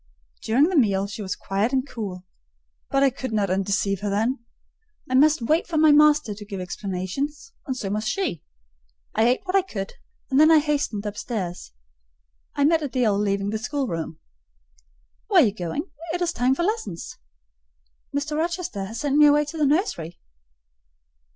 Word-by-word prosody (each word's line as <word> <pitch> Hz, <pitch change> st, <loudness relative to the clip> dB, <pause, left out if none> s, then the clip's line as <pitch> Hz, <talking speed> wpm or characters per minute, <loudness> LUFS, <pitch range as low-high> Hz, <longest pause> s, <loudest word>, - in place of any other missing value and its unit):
During 235 Hz, +5 st, +3 dB
the 360 Hz, +4 st, +2 dB
meal 200 Hz, -8 st, +3 dB
she 200 Hz, +2 st, -7 dB
was 190 Hz, -2 st, -3 dB
quiet 200 Hz, +4 st, -1 dB
and 265 Hz, 0 st, 0 dB
cool: 190 Hz, -7 st, -6 dB, 0.6 s
but 275 Hz, 0 st, +2 dB
I 275 Hz, -, +4 dB
could 260 Hz, 0 st, -6 dB
not 205 Hz, -4 st, 0 dB
undeceive 195 Hz, 0 st, 0 dB
her 205 Hz, -, -2 dB
then. 230 Hz, +5 st, 0 dB, 0.6 s
I 255 Hz, -, -4 dB
must 295 Hz, 0 st, +4 dB
wait 310 Hz, +8 st, +1 dB
for 330 Hz, -, -2 dB
my 310 Hz, 0 st, +6 dB
master 300 Hz, -5 st, +5 dB
to 210 Hz, +1 st, -10 dB
give 200 Hz, -2 st, -6 dB
explanations; 195 Hz, -, -4 dB
and 260 Hz, -2 st, -2 dB
so 195 Hz, -5 st, -3 dB
must 215 Hz, +1 st, -2 dB
she. 245 Hz, -, -1 dB, 0.7 s
I 220 Hz, -, +3 dB
ate 250 Hz, +1 st, +2 dB
what 370 Hz, 0 st, -2 dB
I 390 Hz, -, +6 dB
could, 210 Hz, -, -6 dB, 0.4 s
and 265 Hz, -, +4 dB
then 310 Hz, +1 st, +7 dB
I 325 Hz, -, +7 dB
hastened 290 Hz, -9 st, 0 dB
upstairs. 200 Hz, -, -5 dB, 0.8 s
I 285 Hz, -, +1 dB
met 320 Hz, +1 st, +3 dB
Adèle 245 Hz, -8 st, +1 dB
leaving 200 Hz, 0 st, 0 dB
the 220 Hz, -, -2 dB
schoolroom. 220 Hz, -, -3 dB, 1.1 s
"Where 385 Hz, -6 st, +6 dB
are -, -, +5 dB
you 205 Hz, -, 0 dB
going? 210 Hz, -, -4 dB, 0.2 s
It 355 Hz, -, -3 dB
is 340 Hz, -1 st, -1 dB
time 250 Hz, +2 st, +2 dB
for 345 Hz, -, -1 dB
lessons." 350 Hz, -, -3 dB, 0.9 s
"Mr. 290 Hz, +2 st, -2 dB
Rochester 330 Hz, -, -2 dB
has 220 Hz, +4 st, -7 dB
sent 290 Hz, -1 st, +1 dB
me 300 Hz, 0 st, +8 dB
away 295 Hz, +1 st, +4 dB
to 290 Hz, -, -8 dB
the 295 Hz, -, +3 dB
nursery." 270 Hz, -, -1 dB
250 Hz, 175 wpm, -24 LUFS, 200-300 Hz, 1.1 s, me